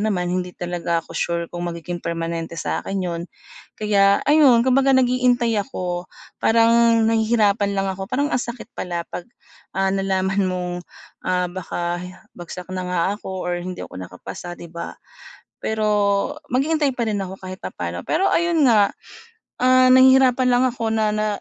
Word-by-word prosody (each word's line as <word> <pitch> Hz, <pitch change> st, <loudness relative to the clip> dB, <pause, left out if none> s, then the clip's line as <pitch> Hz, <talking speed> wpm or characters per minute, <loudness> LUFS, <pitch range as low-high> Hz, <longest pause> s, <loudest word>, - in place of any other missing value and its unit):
naman 200 Hz, -4 st, 0 dB
hindi 180 Hz, -1 st, -3 dB
talaga 170 Hz, -1 st, -2 dB
ako -, -, -12 dB
sure 170 Hz, 0 st, -1 dB
kung 175 Hz, 0 st, -3 dB
magiging 170 Hz, +1 st, -5 dB
permanente 165 Hz, 0 st, -4 dB
sa -, -, -2 dB
akin 195 Hz, -, -4 dB
'yon. 170 Hz, -1 st, -3 dB, 0.5 s
Kaya 200 Hz, -2 st, +3 dB
ayun 275 Hz, -6 st, +5 dB
kumbaga 270 Hz, +1 st, +4 dB
naghihintay 245 Hz, -3 st, +2 dB
ako, 180 Hz, -7 st, -5 dB, 0.3 s
parang 230 Hz, 0 st, +4 dB
nahihirapan 220 Hz, -2 st, +2 dB
lang 195 Hz, -, 0 dB
ako 190 Hz, +1 st, -7 dB
parang 285 Hz, +3 st, -1 dB
ang 250 Hz, -, +2 dB
sakit 235 Hz, 0 st, -8 dB
pala 175 Hz, -2 st, -4 dB
pag, 175 Hz, -, -6 dB, 0.5 s
ah, 195 Hz, 0 st, +1 dB
nalaman 195 Hz, 0 st, 0 dB
mong, 180 Hz, -1 st, -3 dB, 0.6 s
ah, 180 Hz, 0 st, +1 dB
baka 175 Hz, -1 st, -3 dB, 0.3 s
bagsak 175 Hz, +1 st, -9 dB
na 185 Hz, -1 st, -3 dB
nga 180 Hz, -1 st, 0 dB, 0.2 s
ako 190 Hz, -3 st, -6 dB
or 175 Hz, 0 st, -2 dB
hindi 180 Hz, 0 st, -6 dB
ako -, -, -9 dB
nakapasa, 95 Hz, -, -8 dB
di -, -, -10 dB
ba. 170 Hz, 0 st, -7 dB, 0.7 s
Pero 220 Hz, -1 st, -1 dB, 0.6 s
maghihinntay 285 Hz, +3 st, +1 dB
pa 235 Hz, -2 st, -1 dB
rin 205 Hz, -2 st, -1 dB
ako 190 Hz, 0 st, -7 dB
kahit 185 Hz, 0 st, -8 dB
papano. 85 Hz, 0 st, -5 dB
Pero 380 Hz, +5 st, +1 dB
ayun 335 Hz, -4 st, +3 dB
nga, 210 Hz, -4 st, +5 dB, 0.7 s
ah, 255 Hz, 0 st, +5 dB
nahihirapan 260 Hz, -1 st, +6 dB
lang 245 Hz, +1 st, +3 dB
ako 230 Hz, -2 st, -3 dB
na 215 Hz, -1 st, +1 dB
na 215 Hz, 0 st, 0 dB
195 Hz, 155 wpm, -21 LUFS, 175-245 Hz, 0.7 s, nahihirapan